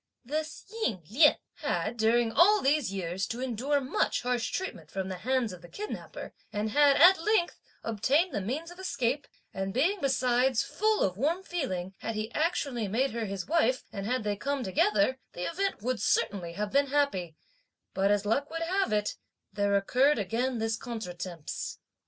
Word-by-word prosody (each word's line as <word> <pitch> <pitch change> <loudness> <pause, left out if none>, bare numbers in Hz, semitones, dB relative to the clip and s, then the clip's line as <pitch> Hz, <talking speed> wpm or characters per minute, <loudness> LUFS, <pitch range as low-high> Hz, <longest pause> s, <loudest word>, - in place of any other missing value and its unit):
"This 310 +4 -4
Ying 345 - -2
Lien 295 +6 +6 0.2
had, - - -1
during 230 +1 +2
all 410 - +6
these 285 - +2
years, 185 0 -2
to 235 - -5
endure 260 +3 0
much 265 -1 0
harsh 245 -1 0
treatment 375 - -5
from 190 -1 -4
the 185 -1 -5
hands 250 -1 0
of 180 - -11
the 175 - -13
kidnapper, 425 +1 -7 0.2
and 210 +1 -2
had, 290 +2 +5
at 360 +2 +7
length, 405 -2 +1 0.2
obtained 270 - +1
the 205 - -1
means 290 - -4
of 350 - -13
escape; 280 -7 -1 0.3
and 195 0 -3
being 355 +9 +2
besides 255 -2 +2
full 435 0 +1
of 185 -1 0
warm 325 - 0
feeling, 195 - -3
had 225 - -4
he 215 +1 -3
actually 285 - 0
made 250 +7 +1
her 230 -1 -2
his 195 -2 -4
wife, 265 -6 +2
and 200 0 -4
had 250 -1 0
they 205 -1 0
come 275 +5 -2
together, 210 +5 +2
the 175 - -5
event 380 - -2
would 250 -1 -1
certainly 180 -4 0
have 205 +3 -3
been 280 0 +3
happy; 265 - 0 0.6
but, 195 +1 +2
as 205 0 +2
luck 275 +7 +1
would 330 +1 -3
have 380 - 0
it, 210 -1 0 0.4
there 200 0 +1
occurred 255 +9 +3
again 235 +5 -1
this 225 0 0
contretemps. 180 - -6
245 Hz, 175 wpm, -29 LUFS, 205-290 Hz, 0.6 s, at